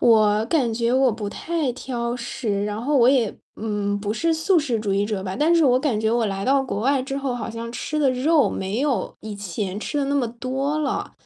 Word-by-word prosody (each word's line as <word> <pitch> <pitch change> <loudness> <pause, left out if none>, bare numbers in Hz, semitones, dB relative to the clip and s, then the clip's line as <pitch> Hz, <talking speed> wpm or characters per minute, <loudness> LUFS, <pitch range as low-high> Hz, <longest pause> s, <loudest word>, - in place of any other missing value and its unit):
我 215 -2 +4
感 260 -7 +1
觉 235 +1 0
我 260 -1 +4
不 210 -1 -4
太 320 +4 -2
挑 240 -2 -3
食， 235 -4 -2
然 210 +1 -3
后 290 +3 +1
我 240 -3 +5
也， 255 -5 +3 0.3
嗯， 205 -2 -2
不 205 0 -2
是 330 +7 +1
素 325 +3 +3
食 255 -8 -1
主 205 -2 -1
义 200 +1 +2
者 205 -2 -3
吧， 190 0 -4
但 315 +4 +4
是 335 - +4
我 255 -2 +4
感 255 -5 0
觉 220 0 +1
我 235 0 +2
来 195 -1 -3
到 270 +1 +3
国 250 -6 -3
外 270 +3 +2
之 270 +1 -4
后 270 -3 -2
好 240 -1 -4
像 230 +1 -6
吃 305 +5 -3
的 280 -3 +3
肉 285 +4 +3
没 195 +5 -3
有 280 -3 -1
以 215 -2 -7
前 195 0 -4
吃 290 +7 -3
得 285 - +1
那 280 - 0
么 270 -4 +2
多 260 +5 -2
了， 300 -2 -2
240 Hz, 255 characters per minute, -23 LUFS, 210-275 Hz, 0.3 s, 我